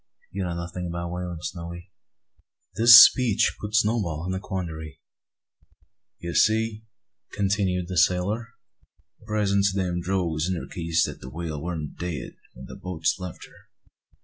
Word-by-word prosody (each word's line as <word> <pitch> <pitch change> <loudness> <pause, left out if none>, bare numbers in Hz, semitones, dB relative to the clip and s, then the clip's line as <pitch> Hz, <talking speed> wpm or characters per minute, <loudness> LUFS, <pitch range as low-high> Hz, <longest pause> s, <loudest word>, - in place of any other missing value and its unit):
You 100 - -4
know 85 -1 -3
nothin' 85 +1 -5
o' 85 0 -3
whalin', 90 -1 -5
Snowy." 85 -1 -7 0.8
This 115 +1 +9
speech 120 -3 +5
put 105 0 -4
Snowball 105 -8 +1
in 95 - -2
a 95 - -2
quandary. 85 -6 -6 1.2
"You 85 0 -6
see, 110 0 +2
nigger," 110 0 -22
continued 95 -3 0
the 90 -2 0
sailor, 90 +7 +1 0.7
"the - - -20
presence 100 -2 +1
o' - - -2
them 90 -2 -1
drogues 85 -3 -1
indercates 85 -2 -1
that - - -8
the 65 - -8
whale 80 0 -5
warn't 80 -3 -5
dead 85 -7 -4 0.2
when - - -10
the - - -10
boats 90 -1 -2
left 90 -2 -8
her." - - -21
90 Hz, 145 wpm, -25 LUFS, 85-100 Hz, 1.2 s, This